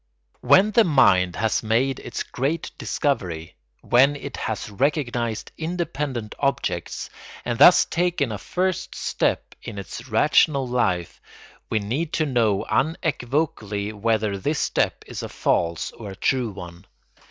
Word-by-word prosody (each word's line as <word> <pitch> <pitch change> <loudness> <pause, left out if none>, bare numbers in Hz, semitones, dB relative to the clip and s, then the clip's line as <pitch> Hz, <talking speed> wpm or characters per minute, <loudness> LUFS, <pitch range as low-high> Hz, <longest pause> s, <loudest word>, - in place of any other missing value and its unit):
When 200 +3 +5
the 230 +2 +5
mind 95 - +4
has 110 +3 0
made 120 +4 +1
its - - -5
great 145 +6 -2
discovery; 90 - -2 0.3
when 135 +4 +4
it 140 -2 -7
has 110 -3 -3
recognised 120 -2 -1
independent 150 -9 -3
objects, 140 0 -2 0.3
and 120 -1 -2
thus 180 - +8
taken 170 -7 0
a 105 - -4
first 185 0 -2
step - - -1
in - - -8
its 100 +5 -7
rational 140 +3 +3
life, 95 -9 -1 0.5
we 110 - +1
need 130 +11 -2
to 155 - +1
know 115 -8 +1
unequivocally 125 - -1
whether 105 -1 0
this 150 +9 -1
step - - 0
is - - -6
a - - -6
false 85 -1 0
or 105 -3 -9
a 95 - -8
true 125 +4 0
one. 90 -2 -10
120 Hz, 135 wpm, -23 LUFS, 105-150 Hz, 0.5 s, thus